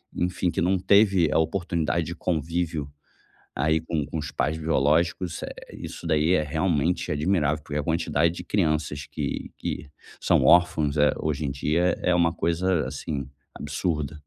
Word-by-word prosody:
enfim, 90 Hz, 0 st, 0 dB
que -, -, -2 dB
não 95 Hz, +2 st, +2 dB
teve 95 Hz, -3 st, +4 dB
a -, -, +2 dB
oportunidade 85 Hz, -1 st, 0 dB
de 85 Hz, -, -5 dB
convívio, 80 Hz, -3 st, -2 dB, 0.6 s
aí 80 Hz, +4 st, +2 dB
com 80 Hz, -3 st, -2 dB
com 80 Hz, -, -5 dB
os 75 Hz, 0 st, -5 dB
pais 80 Hz, +3 st, -1 dB
biológicos, 80 Hz, +3 st, +1 dB
isso, -, -, -5 dB
eh, -, -, -10 dB
isso -, -, -8 dB
daí 80 Hz, +2 st, +3 dB
é 80 Hz, -4 st, +3 dB
realmente 80 Hz, +1 st, 0 dB
admirável, 75 Hz, -2 st, 0 dB
porque 75 Hz, 0 st, -3 dB
a -, -, -2 dB
quantidade 80 Hz, 0 st, +1 dB
de 90 Hz, +1 st, -7 dB
crianças 75 Hz, -7 st, -1 dB
que -, -, -4 dB
que -, -, -4 dB, 0.3 s
são -, -, +3 dB
órfãos, 85 Hz, -4 st, +4 dB
eh, 75 Hz, 0 st, +4 dB
hoje 75 Hz, -1 st, -2 dB
em 70 Hz, -, -1 dB
dia 85 Hz, +5 st, +1 dB
é 90 Hz, -, +3 dB
uma 85 Hz, -1 st, +3 dB
coisa, 85 Hz, 0 st, 0 dB
assim, 70 Hz, 0 st, -4 dB, 0.3 s
absurda. 75 Hz, 0 st, -2 dB
80 Hz, 165 wpm, -25 LUFS, 75-90 Hz, 0.6 s, teve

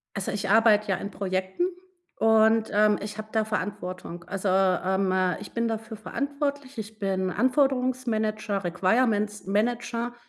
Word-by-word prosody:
Also, 200 Hz, -2 st, -2 dB
ich 200 Hz, -1 st, -3 dB
arbeite 215 Hz, -1 st, +5 dB
ja 190 Hz, -, +2 dB
in 200 Hz, +2 st, -6 dB
Projekten 190 Hz, -, -2 dB, 0.5 s
und, 220 Hz, 0 st, +4 dB
ähm, 210 Hz, 0 st, +4 dB
ich 210 Hz, +1 st, -6 dB
habe 215 Hz, 0 st, -6 dB
da 220 Hz, -1 st, +2 dB
Verantwortung. 185 Hz, -4 st, -5 dB
Also, 195 Hz, 0 st, -3 dB
ähm, 190 Hz, 0 st, +2 dB, 0.3 s
ich 205 Hz, -, -10 dB
bin 230 Hz, 0 st, 0 dB
dafür 220 Hz, 0 st, -4 dB
verantwortlich. 280 Hz, +2 st, -3 dB
Ich 215 Hz, 0 st, -7 dB
bin 190 Hz, -2 st, -1 dB
Anforderungsmanager, 240 Hz, -4 st, 0 dB
Requirements-Manager, 215 Hz, +4 st, 0 dB
215 Hz, 130 wpm, -26 LUFS, 195-230 Hz, 0.5 s, arbeite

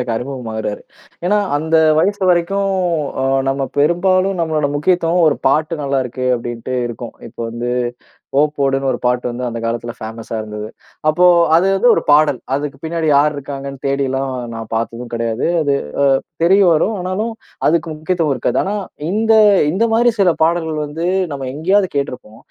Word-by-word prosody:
எனக்கு 120 Hz, -2 st, -2 dB
அறிமுகமாகுறாரு. 115 Hz, -5 st, -4 dB, 0.4 s
ஏன்னா 205 Hz, +3 st, +2 dB, 0.2 s
அந்த 160 Hz, +2 st, +1 dB, 0.2 s
வயசு 200 Hz, +4 st, +1 dB
வரைக்கும், 195 Hz, +3 st, +1 dB, 0.5 s
அ -, -, +1 dB, 0.3 s
நம்ம 135 Hz, 0 st, -2 dB
பெரும்பாலும் 185 Hz, +4 st, +2 dB
நம்மளோட 155 Hz, -3 st, 0 dB
முக்கியத்துவம், 170 Hz, +2 st, +2 dB
"ஒரு -, -, +1 dB
பாட்டு 155 Hz, +3 st, +1 dB
நல்லா 140 Hz, -1 st, 0 dB
இருக்கு" 130 Hz, +1 st, -4 dB
அப்டின்ட்டு 120 Hz, +1 st, -5 dB
இருக்கும். 120 Hz, 0 st, -8 dB
இப்ப -, -, -22 dB
வந்து, 120 Hz, +1 st, -4 dB, 0.7 s
ஓ 145 Hz, -, +6 dB, 0.2 s
போடுன்னு 135 Hz, -1 st, +1 dB
ஒரு 120 Hz, -, -2 dB
பாட்டு 125 Hz, 0 st, +1 dB
வந்து 125 Hz, +1 st, -5 dB
அந்த 115 Hz, -1 st, -4 dB
காலத்துல 120 Hz, +1 st, -3 dB
ஃபேமஸா 115 Hz, 0 st, -7 dB
இருந்தது. 105 Hz, 0 st, -6 dB, 0.4 s
அப்போ 165 Hz, +4 st, +3 dB, 0.3 s
அது 180 Hz, +3 st, +3 dB
வந்து 195 Hz, +6 st, +3 dB
ஒரு -, -, 0 dB
பாடல். 145 Hz, -3 st, +4 dB, 0.2 s
அதுக்குப் 140 Hz, -1 st, -4 dB
பின்னாடி 165 Hz, 0 st, -2 dB
யார் 150 Hz, +1 st, +3 dB
இருக்காங்கன்னு 140 Hz, -1 st, -7 dB
தேடி 140 Hz, 0 st, 0 dB
எல்லாம் 135 Hz, +1 st, -2 dB, 0.2 s
நான் 115 Hz, -1 st, -7 dB
பார்த்ததும் 115 Hz, +1 st, -3 dB
கிடையாது. 115 Hz, 0 st, -1 dB, 0.2 s
அது 140 Hz, -1 st, +1 dB
அ -, -, -9 dB, 0.5 s
தெரியவரும், 190 Hz, +2 st, +4 dB
ஆனாலும் 190 Hz, +6 st, -2 dB, 0.4 s
அதுக்கு 170 Hz, +1 st, +1 dB
முக்கியத்துவம் 160 Hz, -1 st, -1 dB
இருக்காது. 125 Hz, -, -1 dB
ஆனா 200 Hz, +2 st, -2 dB, 0.4 s
இந்த 220 Hz, +3 st, +2 dB, 0.4 s
இந்த 205 Hz, +7 st, +1 dB
மாரி 240 Hz, +1 st, +4 dB
சில 185 Hz, -3 st, +5 dB
பாடல்கள் 160 Hz, -1 st, 0 dB
வந்து 160 Hz, +4 st, -4 dB, 0.3 s
நம்ம 135 Hz, -2 st, -4 dB
எங்கயாவது 185 Hz, +6 st, +1 dB
கேட்ருப்போம். 125 Hz, -5 st, -4 dB
145 Hz, 155 wpm, -17 LUFS, 125-175 Hz, 0.7 s, ஓ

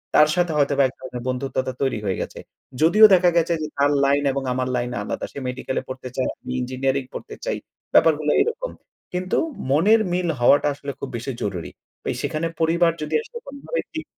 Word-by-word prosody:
তার 150 Hz, -, +7 dB
সাথে 175 Hz, -2 st, +1 dB
হয়তোবা 140 Hz, -1 st, +3 dB
এক 130 Hz, -, -2 dB
ধরনের 130 Hz, -2 st, -7 dB
বন্ধুত্বতা 130 Hz, 0 st, -2 dB
তৈরি 135 Hz, -5 st, 0 dB
হয়ে 95 Hz, -2 st, -1 dB
গেছে। -, -, -6 dB, 0.4 s
যদিও 200 Hz, +8 st, +8 dB
দেখা 180 Hz, -1 st, +6 dB
গেছে 170 Hz, 0 st, +3 dB
যে 155 Hz, -, -2 dB
তার 140 Hz, +1 st, +3 dB
লাইন 140 Hz, +1 st, +3 dB
এবং 135 Hz, 0 st, -2 dB
আমার 130 Hz, 0 st, -1 dB
লাইন 120 Hz, 0 st, -1 dB
আলাদা। 105 Hz, -, -3 dB
সে -, -, -7 dB
মেডিকেলে 130 Hz, +1 st, -3 dB
পড়তে 130 Hz, 0 st, -6 dB
চায়, 130 Hz, -, 0 dB
আমি -, -, -7 dB
ইঞ্জিনিয়ারিং 130 Hz, +2 st, -1 dB
পড়তে -, -, -7 dB
চাই। -, -, -1 dB, 0.4 s
ব্যাপারগুলো 155 Hz, -2 st, +4 dB
এরকম। -, -, -1 dB, 0.4 s
কিন্তু 185 Hz, +1 st, -1 dB, 0.3 s
মনের 205 Hz, +10 st, +5 dB
মিল 180 Hz, 0 st, 0 dB
হওয়াটা 140 Hz, +5 st, +5 dB
আসলে 140 Hz, 0 st, -6 dB
খুব 140 Hz, -, -5 dB
বেশি 120 Hz, +4 st, -4 dB
জরুরি। 90 Hz, -5 st, -4 dB, 0.5 s
সেখানে 155 Hz, +2 st, -1 dB
পরিবার 165 Hz, +1 st, +3 dB
যদি 150 Hz, -, -2 dB
আসলে 470 Hz, +1 st, -9 dB
কোনোভাবে 280 Hz, -, -4 dB
দিক 315 Hz, -1 st, -4 dB
145 Hz, 180 wpm, -23 LUFS, 130-175 Hz, 0.5 s, যদিও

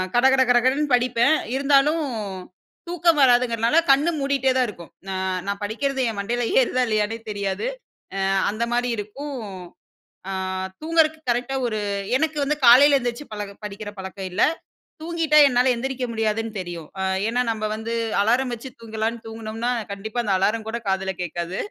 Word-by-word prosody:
கடகட 265 Hz, +2 st, +5 dB
கடகடன்னு 260 Hz, +4 st, +3 dB
படிப்பேன். 245 Hz, +3 st, +3 dB, 0.2 s
இருந்தாலும் 280 Hz, +3 st, +3 dB, 0.9 s
தூக்கம் 340 Hz, -3 st, +2 dB
வராதுங்கிறதுனால 245 Hz, +2 st, +3 dB
கண்ண 285 Hz, +5 st, +4 dB
மூடிட்டே 275 Hz, -1 st, +1 dB
தான் 250 Hz, -2 st, +2 dB
இருக்கும். 175 Hz, -5 st, -11 dB, 0.2 s
ந -, -, -4 dB, 0.4 s
நான் 200 Hz, 0 st, -3 dB
படிக்கிறது 265 Hz, +6 st, -1 dB
என் 215 Hz, -, -5 dB
மண்டைல 240 Hz, +4 st, -1 dB, 0.2 s
ஏறுதா 255 Hz, 0 st, 0 dB
இல்லயானே 215 Hz, +1 st, 0 dB
தெரியாது. 200 Hz, -, -2 dB, 0.5 s
அ -, -, -1 dB, 0.3 s
அந்த 215 Hz, +3 st, -2 dB
மாரி 245 Hz, 0 st, +1 dB
இருக்கும். 270 Hz, +7 st, -6 dB, 0.9 s
அ -, -, -3 dB, 0.5 s
தூங்குறது 315 Hz, -1 st, +2 dB
கரெக்ட்டா 245 Hz, +3 st, -1 dB
ஒரு 215 Hz, -2 st, -2 dB, 0.4 s
எனக்கு 315 Hz, -1 st, -1 dB
வந்து 300 Hz, +2 st, 0 dB
காலைல 275 Hz, +4 st, +8 dB
எந்திரிச்சு, 240 Hz, +3 st, -4 dB
பழக 205 Hz, -1 st, -6 dB
படிக்கிற 205 Hz, +1 st, -7 dB
பழக்கம் 190 Hz, 0 st, -6 dB
இல்ல. -, -, +1 dB, 0.6 s
தூங்கிட்டா 325 Hz, -2 st, +1 dB
என்னால 250 Hz, -1 st, +3 dB
எந்திரிக்க 260 Hz, +1 st, -3 dB
முடியாதுன்னு 225 Hz, 0 st, -1 dB
தெரியும். 170 Hz, -3 st, -7 dB
அ, -, -, 0 dB, 0.2 s
ஏன்னா 245 Hz, +2 st, +1 dB
நம்ம 215 Hz, -1 st, -2 dB
வந்து 220 Hz, +1 st, -5 dB, 0.3 s
அலாரம் 245 Hz, +4 st, +2 dB
வச்சு 240 Hz, +3 st, -7 dB
தூங்கலான்னு 225 Hz, +1 st, -3 dB
தூங்குனோம்னா, 225 Hz, +2 st, -4 dB, 0.2 s
கண்டிப்பா 215 Hz, +4 st, -5 dB
அந்த 205 Hz, -, 0 dB
அலாரம் 215 Hz, +3 st, 0 dB
கூட 235 Hz, -, -2 dB
காதில 190 Hz, 0 st, 0 dB
கேட்காது. 175 Hz, +1 st, -4 dB
240 Hz, 145 wpm, -23 LUFS, 215-270 Hz, 0.9 s, காலைல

